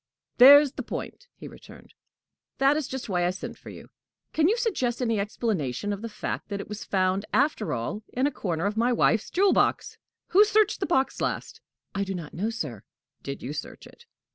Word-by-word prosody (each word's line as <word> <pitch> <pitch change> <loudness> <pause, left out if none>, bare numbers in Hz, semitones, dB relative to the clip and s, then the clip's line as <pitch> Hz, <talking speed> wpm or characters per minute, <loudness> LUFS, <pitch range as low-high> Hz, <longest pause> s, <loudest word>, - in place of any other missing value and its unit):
"There's 285 +2 +9
the - - -6
point!" - - -7
he - - -10
returned. - - -15 0.6
"That 275 +2 +4
is 300 -3 -2
just 260 -2 -6
why 180 -4 0
I 175 - +2
sent 185 +1 -6
for - - -13
you! - - -12 0.4
Can 315 0 +3
you 450 - +2
suggest 300 - -1
any 230 -4 0
explanation 205 - -2
of 200 - -6
the 230 - -5
fact 215 - -5
that 200 -1 -3
it - - -7
was 210 0 -7
found, 190 0 0
after 280 -6 +1
all, 125 - -3
in 255 +2 0
a 290 - +1
corner 170 - -3
of 205 +1 -1
my 235 +3 +2
wife's 225 -2 +2
jewel 390 +2 +3
box? - - 0 0.3
Who 400 +3 +7
searched 425 -1 +2
the 380 - -2
box 270 -5 0
last?" - - -3 0.3
"I 200 - -1
do 195 -1 -4
not 165 -4 -7
know, 205 +6 -2
sir." 150 - -5 0.4
"Did 140 - -7
you 135 +4 -4
search 150 - -7
it?" 475 - -17
225 Hz, 205 wpm, -26 LUFS, 190-285 Hz, 0.6 s, There's